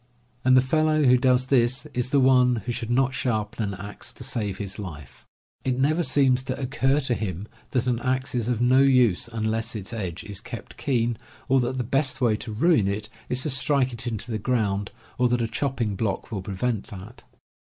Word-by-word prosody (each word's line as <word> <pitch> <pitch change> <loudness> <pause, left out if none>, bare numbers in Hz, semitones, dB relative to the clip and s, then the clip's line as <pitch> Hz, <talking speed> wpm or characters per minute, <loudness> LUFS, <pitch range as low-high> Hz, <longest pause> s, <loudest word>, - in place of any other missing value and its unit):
And 130 0 +5
the 130 - +5
fellow 155 +2 +2
who 125 -2 +6
does 125 0 +3
this 130 +1 +2
is 125 0 -1
the 140 - +3
one 125 -3 +4
who 120 - -2
could 115 -1 -5
not 130 +1 +2
sharpen 110 -3 -2
an - - -5
axe 100 +2 -7
to - - -10
save 110 -6 -2
his 100 0 -6
life. 75 -9 -9 0.4
It 130 -1 0
never 155 +6 +2
seems 130 -3 +3
to 130 +1 -4
occur 135 +1 +1
to 130 -3 +1
him 100 -3 -4 0.2
that 125 -2 0
an 125 -2 0
axe 130 +1 -1
is 120 -2 -1
of 120 -2 0
no 125 +2 +5
use 125 -8 +4
unless 115 0 -2
its 105 +2 -6
edge 95 -6 -4
is 100 -1 -7
kept 120 -1 -9
keen, 120 -5 0 0.3
or 135 0 +4
that 125 +1 -1
the 125 - 0
best 135 +3 +1
way 120 -4 +3
to 110 - -6
ruin 130 - +3
it 105 +2 -2 0.2
is 125 +1 0
to 150 - -1
strike 130 0 +1
it 115 +1 -3
into 115 +1 -4
the 110 - -2
ground, 100 -4 0 0.3
or 125 - +4
that 120 0 +1
a 115 - 0
chopping 115 -3 -2
block 100 +1 -3
will 100 -4 -3
prevent 100 +3 -2
that. 100 +5 -10
125 Hz, 210 wpm, -25 LUFS, 110-130 Hz, 0.4 s, who